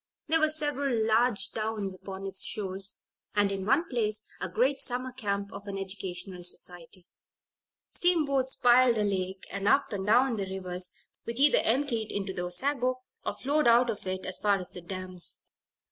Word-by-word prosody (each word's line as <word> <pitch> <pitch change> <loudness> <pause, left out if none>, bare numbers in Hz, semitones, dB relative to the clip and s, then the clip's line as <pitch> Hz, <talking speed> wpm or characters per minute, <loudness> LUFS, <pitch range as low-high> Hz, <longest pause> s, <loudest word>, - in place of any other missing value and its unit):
There 325 +1 +4
were 310 0 +4
several 290 -4 0
large 220 -3 +2
towns 215 -3 -2
upon 190 +1 -8
its 195 -1 -2
shores, 195 -1 -1 0.3
and, 205 -1 +3
in 195 0 -3
one 295 +8 +3
place, 215 -5 0 0.2
a - - -2
great 270 +4 +1
summer 255 +1 +1
camp 200 -5 -3
of 200 +1 -8
an 200 -1 -4
educational 190 -1 -5
society. 175 0 -4 0.9
Steamboats 280 -7 +2
plied 245 0 +5
the 215 - +1
lake, 190 -2 -2
and 200 0 -2
up 275 -1 +3
and 195 0 -3
down 245 +2 +4
the 195 -2 -2
rivers 180 -1 -1 0.3
which 230 +2 -2
either 290 +1 +6
emptied 235 -3 0
into 195 -1 -3
the 180 - -4
Osago, 255 +7 0 0.3
or - - -2
flowed 290 0 +1
out 235 +1 +5
of 205 -3 -8
it, 185 0 -3
as 185 - -1
far 205 -1 +3
as 180 -2 -7
the 180 - -8
dams. 185 0 -4
210 Hz, 175 wpm, -29 LUFS, 190-255 Hz, 0.9 s, either